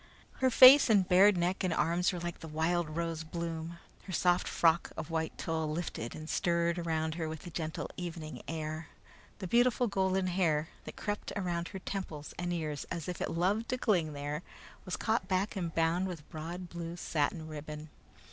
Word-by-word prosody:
Her 260 Hz, -, +4 dB
face 255 Hz, +2 st, +9 dB
and 200 Hz, -4 st, +4 dB
bared 195 Hz, +1 st, +6 dB
neck 175 Hz, +2 st, 0 dB
and 185 Hz, -, +1 dB
arms 170 Hz, +3 st, +2 dB
were 180 Hz, -, -4 dB
like 175 Hz, 0 st, -5 dB
the 165 Hz, -, -8 dB
wild 160 Hz, +2 st, 0 dB
rose 165 Hz, 0 st, -3 dB
bloom. 165 Hz, 0 st, -5 dB, 0.3 s
Her 190 Hz, -, -7 dB
soft 180 Hz, 0 st, +2 dB
frock 165 Hz, 0 st, +2 dB
of 155 Hz, -, -5 dB
white 160 Hz, -1 st, -2 dB
tulle 160 Hz, -1 st, -2 dB
lifted 155 Hz, -8 st, -4 dB
and 155 Hz, 0 st, -8 dB
stirred 170 Hz, +1 st, +1 dB
around 160 Hz, -2 st, -1 dB
her 160 Hz, -1 st, -3 dB
with 160 Hz, -1 st, -6 dB
the 175 Hz, -, -9 dB
gentle 160 Hz, -1 st, -3 dB
evening 170 Hz, -3 st, -6 dB
air. 155 Hz, 0 st, -4 dB, 0.5 s
The 195 Hz, -, -6 dB
beautiful 245 Hz, +5 st, +3 dB
golden 190 Hz, -3 st, +1 dB
hair, 170 Hz, -4 st, +1 dB, 0.2 s
that -, -, -8 dB
crept 205 Hz, -1 st, -3 dB
around 175 Hz, -3 st, -2 dB
her 195 Hz, -, -7 dB
temples 180 Hz, -6 st, -5 dB
and 175 Hz, 0 st, -2 dB
ears 155 Hz, -4 st, -3 dB
as 165 Hz, -3 st, -4 dB
if 180 Hz, -, -4 dB
it -, -, -1 dB
loved 195 Hz, +7 st, 0 dB
to 255 Hz, -, 0 dB
cling 175 Hz, -11 st, +1 dB
there, 145 Hz, +2 st, -4 dB, 0.4 s
was 185 Hz, -, -3 dB
caught 225 Hz, +1 st, 0 dB
back 190 Hz, +3 st, 0 dB
and 175 Hz, -4 st, -2 dB
bound 165 Hz, +3 st, +2 dB
with 165 Hz, -5 st, -7 dB
broad 170 Hz, +3 st, -6 dB
blue 170 Hz, 0 st, -6 dB
satin 160 Hz, 0 st, -1 dB
ribbon. 150 Hz, 0 st, -7 dB
170 Hz, 185 wpm, -32 LUFS, 160-185 Hz, 0.5 s, face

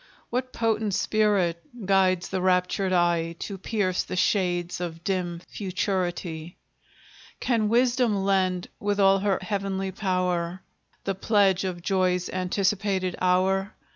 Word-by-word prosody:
What 255 Hz, +1 st, -2 dB
potent 220 Hz, -3 st, 0 dB
spirit 200 Hz, -5 st, +1 dB, 0.2 s
guides 185 Hz, -2 st, +2 dB
the 190 Hz, -1 st, -2 dB
raptured 185 Hz, +1 st, +1 dB
eye 170 Hz, -2 st, +2 dB
To 195 Hz, +1 st, -6 dB
pierce 190 Hz, -3 st, 0 dB
the -, -, -5 dB
shades 180 Hz, -2 st, 0 dB
of 165 Hz, -1 st, -5 dB
dim 180 Hz, -3 st, -2 dB
futurity? 180 Hz, -4 st, -3 dB, 0.8 s
Can 225 Hz, -4 st, +1 dB
Wisdom 240 Hz, -1 st, +3 dB
lend, 185 Hz, -2 st, +1 dB
with 205 Hz, 0 st, -1 dB
all 195 Hz, 0 st, +5 dB
her 195 Hz, -1 st, +1 dB
heavenly 195 Hz, -2 st, -2 dB
power, 180 Hz, -2 st, -1 dB, 0.4 s
The 195 Hz, -, -1 dB
pledge 195 Hz, -1 st, +2 dB
of 175 Hz, -2 st, -4 dB
Joy's 185 Hz, -2 st, +1 dB
anticipated 185 Hz, 0 st, 0 dB
hour? 190 Hz, +2 st, +2 dB
190 Hz, 120 wpm, -26 LUFS, 180-200 Hz, 0.8 s, all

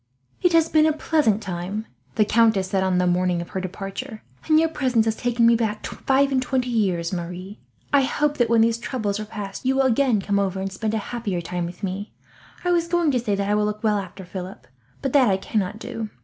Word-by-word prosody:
"It 360 Hz, -, +4 dB
has 330 Hz, -1 st, +5 dB
been 310 Hz, -1 st, +4 dB
a 310 Hz, -, +2 dB
pleasant 290 Hz, -9 st, +1 dB
time," 190 Hz, +3 st, -4 dB, 0.3 s
the 215 Hz, -, +4 dB
countess 220 Hz, -4 st, +3 dB
said, 195 Hz, -, +2 dB
on 190 Hz, -1 st, +1 dB
the 180 Hz, -, +2 dB
morning 180 Hz, 0 st, +1 dB
of 170 Hz, -, -6 dB
her 190 Hz, -, -3 dB
departure; 195 Hz, +6 st, -6 dB, 0.2 s
"and 310 Hz, -1 st, +5 dB
your 325 Hz, -, +3 dB
presence 255 Hz, -8 st, +1 dB
has 220 Hz, -1 st, 0 dB
taken 240 Hz, 0 st, +1 dB
me 235 Hz, 0 st, +6 dB
back 220 Hz, -2 st, -2 dB
five 275 Hz, +1 st, +1 dB
and 260 Hz, -1 st, +2 dB
twenty 255 Hz, -1 st, -1 dB
years, 185 Hz, -6 st, 0 dB
Marie. 180 Hz, +3 st, -6 dB, 0.3 s
I 280 Hz, -, +6 dB
hope 295 Hz, +2 st, 0 dB
that 240 Hz, -2 st, +3 dB
when 230 Hz, -1 st, +4 dB
these 230 Hz, 0 st, +2 dB
troubles 215 Hz, -5 st, -2 dB
are 215 Hz, -, -4 dB
past 205 Hz, -2 st, -7 dB
you 260 Hz, +1 st, +2 dB
will 270 Hz, -, +3 dB
again 255 Hz, -2 st, +3 dB
come 200 Hz, +1 st, 0 dB
over, 190 Hz, -1 st, -1 dB
and 195 Hz, 0 st, -3 dB
spend 215 Hz, +3 st, -2 dB
a 215 Hz, -, -4 dB
happier 215 Hz, -7 st, -2 dB
time 175 Hz, 0 st, -3 dB
with 175 Hz, +4 st, -11 dB
me. 195 Hz, +2 st, -4 dB, 0.5 s
I 355 Hz, -, +2 dB
was 340 Hz, -1 st, +2 dB
going 340 Hz, -3 st, +2 dB
to 255 Hz, -, +1 dB
say 215 Hz, -4 st, -1 dB
that 200 Hz, 0 st, -2 dB
I 205 Hz, -, +1 dB
will 210 Hz, 0 st, +2 dB
look 210 Hz, +1 st, -3 dB
well 210 Hz, -2 st, +2 dB
after 190 Hz, 0 st, -8 dB
Philip, 185 Hz, +1 st, -8 dB, 0.4 s
but 270 Hz, -, -1 dB
that 270 Hz, -4 st, +5 dB
I 190 Hz, -, +2 dB
cannot 200 Hz, +1 st, -2 dB
do. 225 Hz, -1 st, -5 dB
215 Hz, 235 wpm, -23 LUFS, 190-255 Hz, 0.5 s, me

